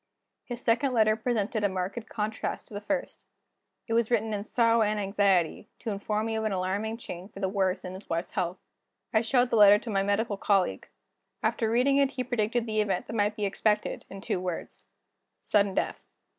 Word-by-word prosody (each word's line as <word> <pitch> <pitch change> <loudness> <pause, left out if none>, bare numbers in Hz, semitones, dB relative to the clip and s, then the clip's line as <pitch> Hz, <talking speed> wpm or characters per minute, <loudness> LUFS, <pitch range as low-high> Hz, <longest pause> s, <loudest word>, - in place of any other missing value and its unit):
His 245 0 -6
second 255 +3 +2
letter 215 -2 +4
presented 220 -2 -1
a 205 - +3
marked 190 +5 -4
contrast 215 0 -3
to - - -14
the 205 - -5
first. 270 +6 -3 0.6
It 225 - -3
was 230 -1 +2
written 225 -2 +1
in 205 0 -3
sorrow 230 0 +3
and 210 0 +1
anxiety, 195 -3 +1
to 225 - -4
inform 210 +2 -2
me 225 0 -2
of 220 - -1
an 215 - 0
alarming 195 +4 -1
change 185 -3 -8
for 195 - -10
the 195 - 0
worse 190 -1 0
in 180 - -6
his 190 +2 -11
wife's 170 +2 -2
health. 180 -1 -2 0.6
I 220 - +4
showed 245 +1 +2
the - - +3
letter 205 -1 +8
to 230 +1 -6
my 195 -1 +2
medical 205 +1 0
colleague. 195 -2 +1 0.6
After 225 - +1
reading 255 +4 +3
it 280 -1 +4
he 260 -2 -3
predicted 235 -1 0
the 215 -1 +1
event 195 -4 -1
that 225 - -7
might 210 -1 +1
be 210 -2 -1
expected, 210 +1 0
in 195 0 -9
two 190 - -1
words: 180 -2 -5 0.6
Sudden 200 -2 +2
death. - - -1
210 Hz, 200 wpm, -28 LUFS, 195-230 Hz, 0.6 s, letter